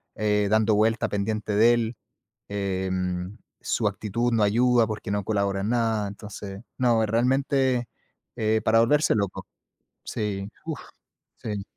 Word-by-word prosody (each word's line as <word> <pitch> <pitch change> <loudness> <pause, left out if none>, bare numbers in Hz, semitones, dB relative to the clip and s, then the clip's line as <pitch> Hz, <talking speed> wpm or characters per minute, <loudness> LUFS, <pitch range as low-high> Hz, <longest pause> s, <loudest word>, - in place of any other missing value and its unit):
eh, 105 -1 +1
dando 110 0 +3
vuelta, 110 +2 +2
pendiente 105 +1 -2
de 115 +3 +6
él, 115 0 -1 0.5
em, 95 -1 -2 0.2
su - - -1
actitud 115 +4 -2
no 115 -2 +2
ayuda 120 +3 +4
porque 110 -2 -5
no 100 0 -1
colabora 100 -1 0
en 105 - -1
nada, 115 -3 +1
entonces 100 0 -8
no, 120 -3 +3
realmente, 130 +1 +1 0.5
eh, 110 0 +1
para 115 +1 +5
volverse 145 +6 +3
loco. 100 -3 -2 0.6
Sí, 100 -2 -3 0.2
uf, - - -4 0.6
sí. 105 -3 -4
110 Hz, 135 wpm, -25 LUFS, 100-115 Hz, 0.6 s, de